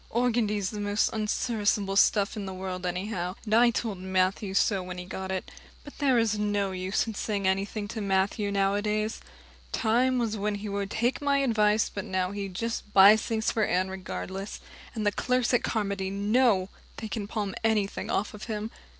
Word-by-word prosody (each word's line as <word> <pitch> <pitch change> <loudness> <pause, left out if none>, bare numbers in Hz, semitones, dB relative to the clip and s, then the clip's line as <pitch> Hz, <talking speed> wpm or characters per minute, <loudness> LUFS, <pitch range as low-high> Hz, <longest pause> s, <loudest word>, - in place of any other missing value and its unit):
Organdy's 220 -5 +1
the 210 - -5
most 205 +1 +1
unserviceable 210 -2 0
stuff 200 +1 +3
in 205 -2 -5
the 190 - -5
world 185 -1 -4
anyhow, 180 0 -3
and 215 - -2
I 240 +2 +6
told 220 -4 -2
Matthew 190 +2 0
so 200 -1 +3
when 180 0 -7
he 180 - -6
got 190 +1 -5
it. 190 -1 -4 0.3
But 290 - -13
there 270 -4 +3
is 220 -2 +1
no 205 -2 0
use 185 +1 -1
in 225 - -5
saying 200 -2 -2
anything 200 +2 -1
to 225 0 -4
Matthew 200 +1 0
nowadays. 205 +2 0 0.5
Time 250 +3 +2
was 230 -3 0
when 210 +1 -1
he 205 +1 -6
would 200 0 -2
take 235 +6 0
my 285 -1 +2
advice, 215 -3 +3
but 200 - -5
now 185 0 -1
he 200 -1 -4
just 215 +2 -4
buys 200 +3 +8
things 220 -1 -1
for 220 - +1
Anne 185 -1 +1
regardless, 190 +1 -6 0.4
and 215 -2 -2
the 205 - +3
clerks 250 +3 0
at 245 - +4
Carmody 200 -3 -1
know 200 0 +2 0.3
they 220 - -5
can 210 -2 -4
palm 205 -3 -3
anything 215 -3 0
off 205 - -1
on 210 - -9
him. 215 0 -4
205 Hz, 185 wpm, -28 LUFS, 195-220 Hz, 0.5 s, buys